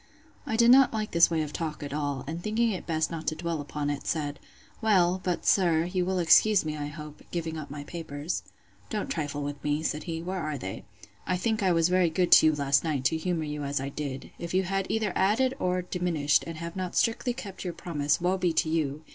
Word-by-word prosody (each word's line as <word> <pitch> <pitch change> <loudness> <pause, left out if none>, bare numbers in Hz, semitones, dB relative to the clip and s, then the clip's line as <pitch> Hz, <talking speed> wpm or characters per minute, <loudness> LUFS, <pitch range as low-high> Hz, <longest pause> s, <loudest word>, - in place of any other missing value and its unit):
I - - -1
did 235 +1 +6
not 265 -1 +6
like 215 -1 -2
this 170 0 +5
way 160 -2 0
of 150 -1 -7
talk 155 -3 -4
at 140 -1 -5
all; 145 -3 -2
and 165 +4 -5
thinking 220 +3 +1
it 185 - -5
best 160 -1 0
not 165 -1 -6
to 155 - +1
dwell 165 -1 -3
upon 145 0 -3
it, 145 - -5
said, 145 -3 -2 0.4
Well, 185 -4 +3
but, 180 -2 -2
sir, 170 -4 +4
you 180 0 -1
will 190 0 -1
excuse 180 +3 +5
me, 155 -1 -2
I 145 -1 -4
hope, 150 0 -9
giving 165 -2 -3
up 155 -2 -6
my 145 0 -6
papers. 155 -1 -4 0.5
Don't 215 -2 -3
trifle 145 -3 -3
with 145 0 -5
me, 150 +1 0
said 150 -1 -2
he; 165 -2 -3
Where 185 +3 -4
are 155 -2 -3
they?—I 105 - -6
think 220 +3 0
I 190 -2 +3
was 165 0 +3
very 180 -1 +3
good 175 +2 0
to - - +9
you 155 - +3
last 140 -1 +2
night, 145 -6 -2
to 160 - +3
humour 165 0 -1
you 150 -1 -4
as 140 0 -1
I 135 +1 -3
did. 140 -2 -6
If 170 +1 -4
you 190 - +3
have 195 +1 -1
either 215 -4 0
added 225 +7 +2
or 180 -3 0
diminished, 170 -5 +1
and 165 -1 -6
have 170 +1 -6
not 185 -2 -4
strictly 235 +2 +1
kept 195 -6 -7
your 180 -2 -3
promise, 150 -4 -1
woe 180 +2 0
be 175 -2 +1
to 160 - +1
you! 155 -2 -1
165 Hz, 235 wpm, -28 LUFS, 150-185 Hz, 0.5 s, to